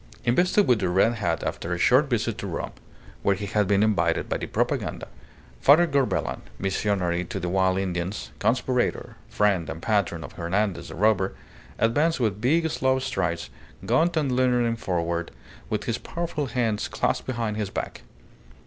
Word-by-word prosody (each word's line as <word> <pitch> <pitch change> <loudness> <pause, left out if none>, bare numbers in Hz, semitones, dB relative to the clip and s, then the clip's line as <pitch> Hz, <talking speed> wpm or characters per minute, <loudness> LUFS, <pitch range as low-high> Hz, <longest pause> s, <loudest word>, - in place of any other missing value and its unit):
Invested 180 - +3
with 125 -3 +4
the 95 -3 0
red 95 +6 +3
hat 110 -3 -1
after 85 - -3
a - - -1
short 130 - +4
visit 115 -2 -1
to 100 - -4
Rome, 85 - -4 0.5
where 100 - +2
he 100 +2 -5
had 105 0 +1
been 100 +1 +3
invited 95 -6 +1
by - - -1
the - - -5
Propaganda, - - -1 0.5
Father 155 +5 +6
Corbelan, 140 -5 0 0.2
missionary 95 -2 0
to - - -5
the 90 - -3
wild 95 0 +2
Indians, 90 0 -3
conspirator, 125 +1 0
friend 100 -5 +1
and 80 - -5
patron 100 -5 0
of 70 - -8
Hernandez 95 +3 -1
the - - -8
robber, 100 -1 +2 0.4
advanced 145 +9 +2
with 105 -4 0
big, 160 +7 +3
slow 130 -1 +1
strides, 85 -10 -2 0.3
gaunt 170 +1 +2
and 140 -5 +1
leaning 125 -2 +2
forward, 85 -5 -2 0.4
with - - -1
his - - -2
powerful 165 -4 -3
hands 115 -3 -1
clasped - - -1
behind 115 -4 -2
his 105 -3 -2
back. - - -5
105 Hz, 165 wpm, -25 LUFS, 95-125 Hz, 0.5 s, Father